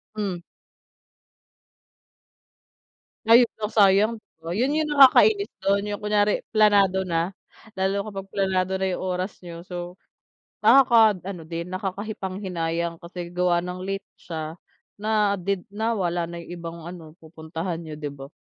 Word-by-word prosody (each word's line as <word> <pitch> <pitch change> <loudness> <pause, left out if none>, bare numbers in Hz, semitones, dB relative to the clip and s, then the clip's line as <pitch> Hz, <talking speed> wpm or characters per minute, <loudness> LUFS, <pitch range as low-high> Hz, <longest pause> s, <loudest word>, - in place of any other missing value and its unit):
Hmm. 200 -4 -2 2.9
Ay, 230 +2 +8 0.2
oh, 215 - -2
sayang 210 +2 +4 0.2
oh, 170 - -3
'yun 250 +7 +1
'yung 310 - +1
nakakainis 400 +10 +6
do'n, 200 +1 +1
'yung 205 - -3
kunwari 210 0 +1
planado 200 -3 +4
na, 175 +1 -1 0.4
lalo 195 +2 -1
kapag 195 -2 -7
planado 190 -1 0
na 190 - -1
'yung 185 -1 -2
oras 185 +1 -3
niyo, 170 0 -9
so 175 0 -7 0.7
nakaka-ano 220 -8 +4
din 170 +1 -5
nakakapanghinayang 185 -4 -3
kasi 170 0 -8
gawa 175 -1 +1
ng 180 +1 -5
late 195 0 -3 0.2
siya 160 0 -6 0.4
na 210 -1 +1
did 185 +1 -2
nawala 200 -5 -1
na 170 0 -7
'yung - - -13
ibang 170 0 -7
ano, 165 -2 -10
pupuntahan 160 +2 -5
niyo, 160 -2 -8
'di 150 -1 -5
ba? 140 0 -10
185 Hz, 130 wpm, -24 LUFS, 170-205 Hz, 2.9 s, Ay